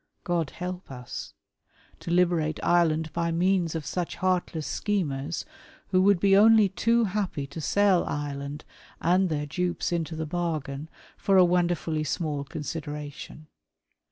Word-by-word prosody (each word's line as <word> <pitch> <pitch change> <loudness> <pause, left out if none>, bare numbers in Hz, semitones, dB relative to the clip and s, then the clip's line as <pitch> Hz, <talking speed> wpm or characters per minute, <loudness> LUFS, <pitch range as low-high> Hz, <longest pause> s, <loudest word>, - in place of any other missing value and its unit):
God 170 -4 0
help 180 +3 -6
us! 125 -2 -8 0.6
To - - -8
liberate 170 -3 +2
Ireland 160 -3 +2
by 170 0 0
means 175 -1 +1
of 160 -2 -3
such 175 -2 -3
heartless 180 -4 -1
schemers, 160 -4 -2 0.4
who 185 -1 +3
would 200 -1 +4
be 195 +1 +4
only 215 0 +6
too 230 +6 +2
happy 195 -8 -2
to 145 +4 -8
sell 200 +2 +3
Ireland 145 0 -4 0.3
and 180 +2 +3
their 150 -2 -1
dupes 175 +5 -2
into 165 -1 -2
the 160 0 -3
bargain, 155 -3 -3 0.3
for 195 -1 +3
a 185 - +8
wonderfully 175 -3 +1
small 150 -1 -2
consideration. 150 0 -6
170 Hz, 135 wpm, -27 LUFS, 150-185 Hz, 0.6 s, a